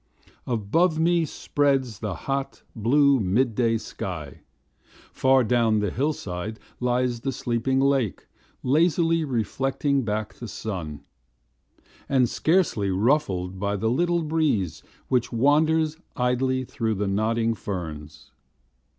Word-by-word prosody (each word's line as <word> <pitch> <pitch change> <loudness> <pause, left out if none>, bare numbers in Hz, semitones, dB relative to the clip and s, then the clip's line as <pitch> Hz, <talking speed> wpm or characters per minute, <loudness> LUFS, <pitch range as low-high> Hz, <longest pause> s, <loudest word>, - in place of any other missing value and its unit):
Above 130 - +1
me 170 +1 +3
spreads 135 -6 0
the 105 -5 -3
hot, 135 0 -3
blue 140 +5 +4
mid 110 +5 +1
day 115 -1 +2
sky, 80 - -6 0.7
Far 130 0 +4
down 115 -1 +2
the 105 -3 0
hillside 110 - -3 0.2
lies 125 -1 0
the 135 +3 -2
sleeping 125 +2 -1
lake 135 -6 +1 0.4
Lazily 165 +3 +2
reflecting 135 +2 0
back 110 -2 -3
the 120 - -8
sun, 85 -10 -5 1.1
And 130 -3 +3
scarcely 155 - +1
ruffled 95 -4 0
by 100 +1 -1
the 110 +3 0
little 170 +5 +1
breeze 150 - 0 0.3
Which 125 -2 +1
wanders 155 +5 +2 0.2
idly 130 +1 +1
through 110 -2 -2
the 100 +1 -1
nodding 115 +3 +1
ferns. 80 -7 -7
125 Hz, 115 wpm, -25 LUFS, 105-140 Hz, 1.1 s, blue